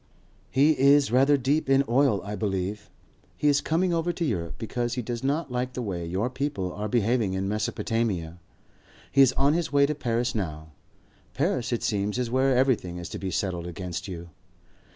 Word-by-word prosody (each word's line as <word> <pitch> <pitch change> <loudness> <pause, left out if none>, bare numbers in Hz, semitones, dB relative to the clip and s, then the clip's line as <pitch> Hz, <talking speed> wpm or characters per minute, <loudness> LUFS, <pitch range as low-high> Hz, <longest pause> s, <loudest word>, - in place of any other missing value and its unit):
"He 140 +4 +4
is 140 -1 +5
rather 135 +3 +4
deep 140 +3 0
in 135 0 +5
oil, 120 -5 +2
I 105 +1 -5
believe. 100 0 -3 0.5
He 150 - +1
is 145 -1 +4
coming 175 +3 +1
over 165 +1 0
to 170 0 -2
Europe 85 - -2
because 120 +1 -3
he 125 - -2
does 120 +2 -4
not 140 +1 -1
like 125 +1 -2
the 125 - -4
way 90 -5 -4
your 95 +7 -1
people 130 -8 -3
are 105 +1 -4
behaving 115 -2 +1
in 95 +1 -2
Mesopotamia. 105 -4 -2 0.7
He 140 - +5
is 130 -2 +6
on 140 +2 +3
his 170 -2 -1
way 140 0 +5
to 150 - 0
Paris 120 -3 -1
now. 80 -7 -4 0.6
Paris 125 0 0
it 120 - -1
seems 105 +1 -1
is 125 -2 -2
where 130 0 +3
everything 120 -10 +1
is 85 -1 -6
to - - -6
be 95 - -3
settled 90 -1 -2
against 90 +2 -5
you. 85 -2 -8
120 Hz, 190 wpm, -26 LUFS, 95-135 Hz, 0.7 s, is